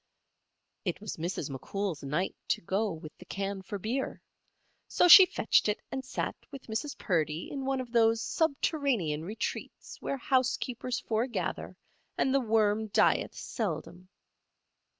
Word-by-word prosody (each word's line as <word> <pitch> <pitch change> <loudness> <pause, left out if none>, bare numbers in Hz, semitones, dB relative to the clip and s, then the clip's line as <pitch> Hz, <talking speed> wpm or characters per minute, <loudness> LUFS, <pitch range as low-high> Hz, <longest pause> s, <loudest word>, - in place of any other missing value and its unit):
It 180 -4 -2
was 210 -1 -6
Mrs. 165 -3 -3
McCool's 175 +5 -3
night 150 +7 -1
to - - 0
go 200 +5 0
with 155 -2 -9
the 180 - -12
can 195 0 -4
for 195 +2 -5
beer. 235 +7 -3 0.7
So - - +4
she 370 +1 +11
fetched 220 - +2
it 210 - 0
and 265 - -3
sat 260 - -3
with 275 -2 -9
Mrs. 225 +6 -4
Purdy 160 -3 -1
in 275 -2 -4
one 270 0 0
of 250 -2 -6
those 225 -1 +4
subterranean 275 - 0
retreats 210 +6 -5
where 275 - -2
house 260 -1 +2
keepers 250 -1 -3
foregather 230 +3 -2 0.4
and 265 - +2
the 275 - +3
worm 220 -2 +2
dieth 210 - +2
seldom. 175 - -4
220 Hz, 145 wpm, -30 LUFS, 180-260 Hz, 0.7 s, she